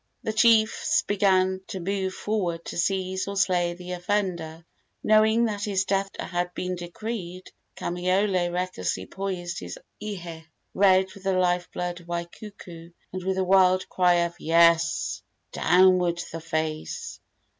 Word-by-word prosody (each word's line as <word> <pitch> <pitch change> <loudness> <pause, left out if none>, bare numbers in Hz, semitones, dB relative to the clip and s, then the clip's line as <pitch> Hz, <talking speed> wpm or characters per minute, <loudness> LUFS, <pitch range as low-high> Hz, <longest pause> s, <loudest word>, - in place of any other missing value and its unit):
The 220 - -2
chiefs 220 -1 +3
began 190 -2 +2
to 190 - -5
move 190 +1 -2
forward 180 -6 -2
to - - -6
seize 190 +1 -1
or 200 0 -4
slay 175 -3 +1
the 180 0 -9
offender. 175 -3 -2 0.4
Knowing 220 +2 +4
that 205 -2 -2
his 195 -2 0
death 195 0 0
had 175 0 -2
been 180 0 -3
decreed, 180 +1 -6 0.2
Kamaiole 180 0 0
recklessly 175 - -2
poised 180 - -4
his - - -7 0.3
ihe, 175 -6 -6 0.3
red 190 -1 +4
with 195 - -13
the 195 0 0
life 180 -1 +1
blood 175 0 -4
of 170 - -17
Waikuku, 170 -1 -8 0.2
and 185 -1 -5
with 190 0 -1
a 190 - +2
wild 185 0 +4
cry 180 -1 +3
of 170 - -5
"Yes, 165 0 +3 0.3
downward 180 -1 +4
the 165 - -6
face!" 155 -1 -4
185 Hz, 140 wpm, -25 LUFS, 175-195 Hz, 0.4 s, Knowing